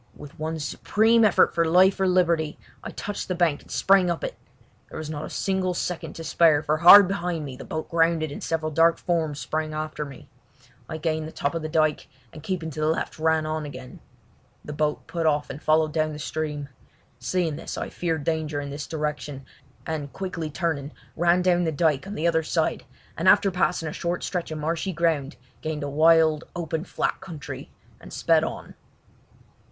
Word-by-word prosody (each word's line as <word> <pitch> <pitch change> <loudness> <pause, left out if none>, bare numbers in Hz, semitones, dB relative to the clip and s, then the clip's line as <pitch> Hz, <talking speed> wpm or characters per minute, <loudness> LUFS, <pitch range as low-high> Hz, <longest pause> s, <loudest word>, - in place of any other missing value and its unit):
With 145 0 -12
one 160 +1 -3
supreme 220 +9 +2
effort 210 -4 +4
for 170 - +2
life 185 +4 +4
or 190 - +2
liberty 170 -4 +2 0.3
I - - -5
touched 205 0 -5
the 185 - -2
bank 170 -4 +1
and - - -20
sprang 195 -2 +3
up 170 - -2
it. - - -3 0.5
There - - -8
was 155 -1 -5
not 155 0 -4
a - - -8
single 190 -2 -1
second 175 -1 -3
to 165 - -8
spare, 160 -1 +4
for 155 0 +1
hard 180 +4 +10
behind 175 -4 -2
me 135 -2 -7
the - - -10
boat 160 0 -4
grounded 165 -2 +1
and - - -7
several 155 -1 -1
dark 165 +2 +4
forms 160 -4 -1
sprang 155 0 -3
after 155 0 -3
me. 140 -3 -11 0.6
I 160 - -4
gained 155 0 -2
the - - -8
top 140 - -2
of 165 - -3
the 155 - -4
dyke, 155 -1 +1 0.3
and 155 - -10
keeping 165 -1 -3
to 155 - -7
the 155 - +1
left 160 0 -2
ran 160 0 +2
on 155 0 -2
again. 130 -3 -9 0.7
The 150 - -6
boat 150 0 -1
put 165 -2 -1
off 150 -1 +1
and 140 +3 -9
followed 155 0 +2
down 155 -1 0
the - - -7
stream. 150 -1 -4 0.5
Seeing 175 -5 -1
this 165 - -6
I - - -4
feared 165 -4 -2
danger 155 -1 -1
in 140 -1 -5
this 145 0 -6
direction, 150 -3 -4 0.4
and 150 -3 -4
quickly 175 -5 -4
turning, 155 -3 -2 0.2
ran 175 +2 +3
down 175 -1 +3
the 160 - 0
dyke 155 0 +1
on 205 - -6
the 160 - -2
other 165 -1 +2
side, 155 - -1 0.3
and - - +3
after 195 - +5
passing 180 -2 0
a 155 - -4
short 175 +1 -3
stretch 180 -2 -3
of 155 - -5
marshy 165 +5 -2
ground 160 -3 0 0.3
gained 155 -1 -3
a 145 - -3
wild, 160 +1 +4
open 165 -1 -3
flat - - -2
country 170 -6 -8 0.3
and - - -13
sped - - +2
on. - - -5
160 Hz, 200 wpm, -25 LUFS, 150-170 Hz, 0.7 s, hard